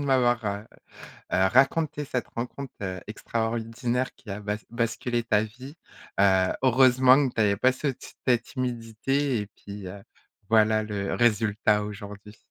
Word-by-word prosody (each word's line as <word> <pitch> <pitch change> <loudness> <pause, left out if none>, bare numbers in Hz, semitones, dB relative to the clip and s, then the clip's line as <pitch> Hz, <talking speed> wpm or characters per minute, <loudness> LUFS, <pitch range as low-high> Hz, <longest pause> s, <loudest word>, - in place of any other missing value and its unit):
heu, - - -2
de - - -3
m'avoir 120 -5 +1 0.6
raconté 135 - +2
cette 125 -2 -3
rencontre, 125 +3 -6
heu, 95 -2 -4
extraordinaire 115 +3 -2
qui 110 - -15
a 100 - -5
bas 105 0 -2
basculé 120 +1 -1
ta 110 -2 +2
vie. 130 +7 -10 0.5
Heu, 95 -2 +4
heureusement 130 +1 +5
que - - -6
tu 110 - +1
avais 100 -1 +2
pas 130 +3 +3
cet 135 -1 -5
cette 120 -2 +3
timidité 125 +1 -2
et 105 - -4
puis 100 -2 -10
heu, 100 +2 -9 0.5
voilà 110 -1 +4
le 100 -2 -3
résultat 105 -2 +2
aujourd'hui. 105 0 -9
115 Hz, 145 wpm, -26 LUFS, 105-130 Hz, 0.6 s, heureusement